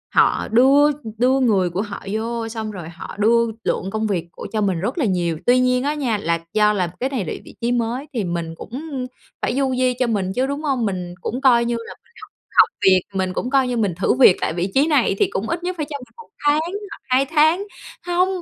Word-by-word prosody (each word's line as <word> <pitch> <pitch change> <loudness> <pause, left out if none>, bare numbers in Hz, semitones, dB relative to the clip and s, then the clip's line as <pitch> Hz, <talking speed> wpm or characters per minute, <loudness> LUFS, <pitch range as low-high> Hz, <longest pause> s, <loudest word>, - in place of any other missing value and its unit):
họ - - +3
đưa 275 +5 +5 0.3
đưa 255 +3 +3
người 205 -8 +2
của 180 +4 -2
họ 205 -2 -6
vô 225 +2 -2
xong 220 -1 -5
rồi 175 -5 -8
họ 170 +2 -9
đưa 235 +2 +4 0.2
lượng 190 - -1
công 220 +1 -1
việc 180 -5 -2
của - - -8
cho 215 - 0
mình 190 -4 0
rất 220 - -3
là 300 - +1
nhiều. 175 -5 0
Tuy 250 +1 +5
nhiên 250 0 +2
á 290 +2 0
nha, 255 -8 -1
là 170 -4 -1
do 210 0 +4
là 185 -4 0
cái 260 - 0
này 245 -9 -2
là - - -3
vị - - -14
trí 235 +1 0
mới 245 +4 -1
thì 230 -5 -1
mình 170 -2 -3
cũng 265 - -6 0.3
phải - - -1
du 265 -1 +1
di 255 0 +2
cho 255 - +2
mình 195 -5 -1
chứ, 260 +1 +1
đúng 285 +2 -4
hông? 265 -6 0
Mình 180 -3 -4
cũng 250 +4 -3
coi 240 -3 +5
như 240 - 0
là 230 0 -7
mình - - -30 0.5
học - - +12
học - - +6 0.2
việc, 185 -1 +6
mình 185 -1 -1
cũng 245 +6 -3
coi 265 -2 +3
như 245 - -1
mình 205 -6 0
thử 180 +6 +1
việc 250 -8 +6
tại - - 0
vị 175 +3 -2
trí 275 +3 +4
này 275 -10 +2
thì - - +4
cũng 215 - -3
ít 335 +1 -2
nhất 365 0 -2
phải 305 -3 -3
cho 285 - -3
mình 250 - -15
1 460 -1 -13 0.2
tháng 295 +1 +4 0.3
hoặc - - -9
2 260 +1 +3
tháng. 315 +6 +3 0.4
Hông, 355 +1 +2
235 Hz, 250 wpm, -21 LUFS, 195-270 Hz, 0.5 s, học